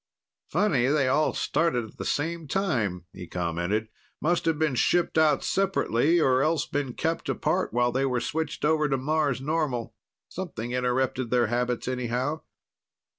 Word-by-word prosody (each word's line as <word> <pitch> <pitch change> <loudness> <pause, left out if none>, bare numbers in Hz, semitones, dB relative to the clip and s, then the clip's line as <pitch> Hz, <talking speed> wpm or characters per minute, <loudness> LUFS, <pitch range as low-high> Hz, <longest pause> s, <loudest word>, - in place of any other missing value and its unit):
"Funny 155 -9 +2
they 140 -1 +2
all 150 +4 +2
started 160 -9 0
at 110 - -15
the - - -5
same 165 +1 -2
time," 120 - -1
he 90 -2 -9
commented. 90 +6 -2 0.3
"Must 175 +3 +1
have 165 -2 +2
been 155 -3 +1
shipped 175 +7 +2
out 155 -1 +3
separately 175 -5 +2
or 130 -4 +3
else 155 0 +1
been 140 -3 -3
kept 165 0 -2
apart 155 +7 0
while 120 0 +2
they 135 +2 +1
were 125 -2 0
switched 155 +3 -3
over 155 -1 +2
to 135 - +1
Mars 145 -1 0
normal. 145 -5 -1 0.3
Something 135 -11 -5
interrupted 125 0 0
their 125 0 +3
habits, 125 0 -1
anyhow." 130 +4 -2
135 Hz, 155 wpm, -27 LUFS, 120-160 Hz, 0.3 s, out